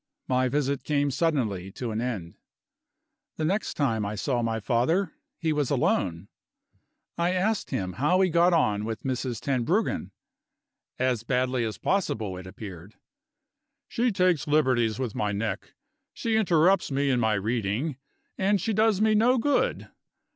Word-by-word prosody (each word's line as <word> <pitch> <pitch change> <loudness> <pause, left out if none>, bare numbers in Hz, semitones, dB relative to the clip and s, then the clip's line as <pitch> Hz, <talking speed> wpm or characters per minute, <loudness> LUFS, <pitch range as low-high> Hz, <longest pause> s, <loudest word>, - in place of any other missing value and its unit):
My 130 0 +2
visit 140 0 -1
came 145 -1 +1
suddenly 115 - -1
to 120 -1 -4
an 110 +1 -2
end. 105 -10 -4 1.0
The 155 - -1
next 195 +6 -1
time 115 -7 0
I 100 +1 -3
saw 120 +3 -1
my 115 -1 -1
father, 145 - +1 0.2
he 160 -2 0
was 145 -3 0
alone. 95 - 0 0.9
I 175 +2 +2
asked 200 +3 0
him 90 -1 -2
how 150 - +2
he 185 -2 +3
got 170 +2 +4
on 105 -11 +2
with 110 0 -4
Mrs. 130 -3 -2
Tenbruggen. 130 -4 0 0.9
As 125 -3 +1
badly 125 0 0
as 110 -2 -3
possible, 110 - -1
it 90 0 -9
appeared. 95 0 -10 0.9
"She 240 0 0
takes 180 -6 +2
liberties 130 -7 +2
with 125 -5 -3
my 105 -1 -1
neck; 110 +3 -4 0.4
she 225 -1 -1
interrupts 185 -2 +3
me 140 0 +1
in 125 - +2
my 110 -2 +2
reading; 115 +6 -1 0.4
and 200 +1 +2
she 220 +5 -1
does 215 -1 +3
me 215 0 +4
no 235 +4 +4
good. 285 +4 +1
130 Hz, 150 wpm, -27 LUFS, 110-170 Hz, 1.0 s, got